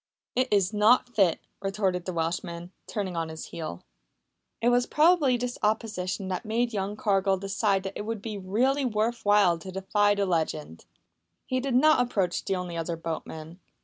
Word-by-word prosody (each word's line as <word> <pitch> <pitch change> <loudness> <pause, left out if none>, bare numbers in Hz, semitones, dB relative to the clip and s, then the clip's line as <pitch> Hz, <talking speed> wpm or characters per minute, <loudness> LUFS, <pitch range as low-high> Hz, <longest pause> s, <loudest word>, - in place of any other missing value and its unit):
"It 255 +1 +2
iss 200 -1 +2
not 220 +4 +4
fit," 195 -8 +2 0.2
retorted 195 -3 -1
the 185 - -2
Welshman, 170 +1 -3 0.2
turning 195 -4 -3
on 165 -1 -2
his 160 0 -7
heel. 155 - -6 0.8
It 235 - +3
was 245 0 +3
probably 300 -5 +4
this 245 0 -4
opposition 210 -3 -1
that 185 -1 -3
made 235 +2 0
young 200 0 -2
Cargill 195 -2 +2
decide 195 0 0
that 195 0 -5
it - - -4
would 225 -1 -2
be 215 +1 -5
really 235 +9 +1
worth 230 -1 -1
while 205 -5 +4
to 185 +3 -8
defy 205 +2 +2
the 200 -1 +1
legend. 155 - -2 0.6
He 255 - -1
did 260 -1 -1
not 305 +1 +5
approach 195 -8 0
the 195 - -1
only 180 -2 -4
other 165 0 -2
boatman. 160 +1 -6
200 Hz, 175 wpm, -27 LUFS, 180-230 Hz, 0.8 s, not